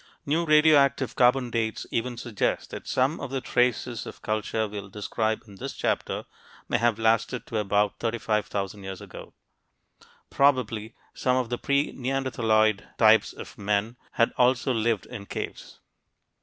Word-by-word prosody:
New 160 +4 +1
radioactive 145 -5 +4
carbon 125 0 +3
dates 110 -2 -1
even 120 +1 -2
suggest 115 -4 -2
that - - -8
some 135 +6 +1
of - - -5
the 135 0 -2
traces 125 -2 0
of - - -10
culture 110 +1 -1
we'll 100 -1 -7
describe 110 +2 -2
in 100 -3 -14
this - - -5
chapter - - -2 0.4
may - - +1
have 115 -1 +2
lasted 115 +2 +1
to 110 - -2
about 105 0 +1
35,000 105 -3 -2
years 95 -1 -6
ago. - - -11 1.0
Probably 120 -5 +1 0.2
some 125 0 +1
of 125 -3 -1
the 120 - -2
pre 140 +1 +1
neanderthaloid 115 -5 +1
types 110 -1 +5
of - - -11
men 105 +3 0 0.2
had 115 - +2
also 125 +1 +3
lived 115 -1 0
in 100 -5 -9
caves. - - -6
115 Hz, 145 wpm, -26 LUFS, 110-125 Hz, 1.0 s, types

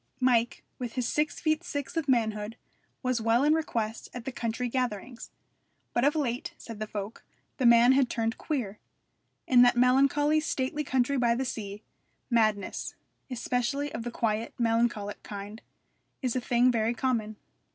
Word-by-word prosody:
Mike, 240 -2 +2 0.2
with 245 -3 -4
his 250 -3 -1
six 305 +3 0
feet 310 0 +1
six 285 -1 -5
of 320 -4 -1
manhood, 220 -3 0 0.5
was 255 -2 0
well 230 +3 +3
in 300 +1 +5
request 230 -8 -2
at 245 -1 -6
the 265 - -3
country 240 0 -2
gatherings. 245 -1 -3 0.6
But 240 - +1
of 290 +3 +3
late, 250 -5 -2
said 225 -2 -9
the 215 - -3
folk, 205 +1 -6 0.3
the 255 - +3
man 235 +1 +7
had 265 -2 +3
turned 225 0 -2
queer: 230 -10 -3 0.7
in 250 -2 +6
that 245 0 +5
melancholy, 275 +4 +4
stately 300 -1 -2
country 265 0 +1
by 235 -1 +3
the 265 +2 -1
sea, 210 -3 -5 0.5
madness 215 -4 0 0.3
especially 250 +3 -1
of 225 - -4
the 240 - -4
quiet, 225 -1 -2
melancholic 225 -3 0
kind 205 +2 -8 0.6
is 255 -1 0
a 255 - 0
thing 245 +1 +3
very 230 0 0
common. 230 -4 -1
240 Hz, 160 wpm, -28 LUFS, 225-265 Hz, 0.7 s, man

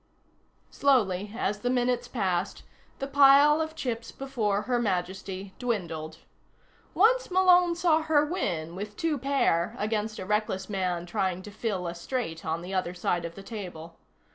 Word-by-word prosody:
Slowly, 210 -8 +2
as 205 -2 -1
the 245 - -1
minutes 245 -1 +1
passed, 190 -7 -2 0.3
the 275 - -3
pile 280 +2 +6
of 315 0 -4
chips 230 -5 -4
before 220 -7 -1
Her 245 +1 0
Majesty 190 -1 -3
dwindled. 165 -10 -3 0.8
Once - - +4
Malone 360 -2 +5
saw 335 -2 +3
her 310 -2 +3
win 175 - -2
with 205 +2 -7
two 315 -4 0
pair 255 -11 +1
against 215 0 -2
a 185 - -5
reckless 210 -2 -1
man 180 -3 -1
trying 185 +1 -2
to 210 - -9
fill 205 -4 -3
a 170 - -3
straight 170 -2 -4
on 160 +2 -2
the 185 +2 -6
other 185 -1 -1
side 175 -1 -1
of 170 0 -7
the 195 - -10
table. 180 -6 -8
210 Hz, 155 wpm, -28 LUFS, 180-270 Hz, 0.8 s, pile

